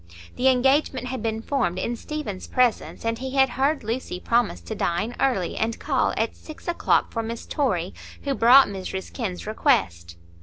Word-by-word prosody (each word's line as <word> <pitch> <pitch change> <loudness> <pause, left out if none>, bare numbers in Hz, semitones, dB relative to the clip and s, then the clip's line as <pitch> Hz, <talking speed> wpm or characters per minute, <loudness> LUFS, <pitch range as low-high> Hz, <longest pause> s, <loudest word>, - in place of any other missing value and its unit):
The 255 - +1
engagement 265 0 +2
had 260 -2 -4
been 225 0 -2
formed 225 -12 0
in 235 +5 -2
Stephen's 235 -7 -6
presence, 250 -2 0
and 230 0 -1
he 265 +1 -5
had 265 -1 +5
heard 275 +3 0
Lucy 225 -4 -3
promise 235 - +1
to 85 - -6
dine 175 +8 -1
early 240 -10 +1
and 225 +1 -1
call 275 -3 0
at 225 +1 -1
six 310 +2 -12
o'clock 345 - +1
for 230 - -2
Miss 230 +1 -6
Torry, 190 - -1 0.3
who 280 - 0
brought 260 +2 +7
Mrs 190 -1 -6
Kenn's 200 -8 -4
request. 145 - 0
235 Hz, 175 wpm, -24 LUFS, 205-265 Hz, 0.3 s, brought